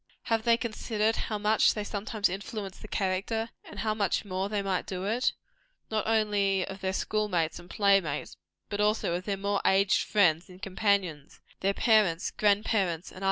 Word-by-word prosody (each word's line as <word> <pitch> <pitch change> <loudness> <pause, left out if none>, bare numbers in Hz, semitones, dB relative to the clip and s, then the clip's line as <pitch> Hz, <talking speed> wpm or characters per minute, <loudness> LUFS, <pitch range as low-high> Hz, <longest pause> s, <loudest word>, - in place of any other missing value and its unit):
Have 225 -1 0
they 230 -1 +5
considered 225 -1 -1
how 215 - -2
much 210 +1 +3
they 210 - -2
sometimes 210 +1 -1
influence 195 +1 -6
the - - -10
character 205 +4 -1
and - - -8
how 215 -1 0
much 205 -1 0
more 190 0 -2
they 205 -1 -1
might 190 -2 -1
do 185 -1 -4
it 230 +5 +1 0.6
not 215 -1 -1
only 205 -4 +2
of 195 0 -8
their 190 0 0
school 210 +2 -1
mates 165 -4 0
and 175 +1 -14
play 200 -1 +4
mates, 150 -4 -5 0.3
but 205 0 -2
also 210 -4 +1
of 180 +1 -3
their 200 -2 -1
more 200 +1 -1
aged 195 0 +3
friends 175 -5 +2
and 180 0 -13
companions 190 -6 -1 0.2
their 195 +1 0
parents, 210 -7 +3
grand 205 0 +2
parents, 180 -5 0
and - - -14
others? - - -7
200 Hz, 190 wpm, -29 LUFS, 185-215 Hz, 0.6 s, they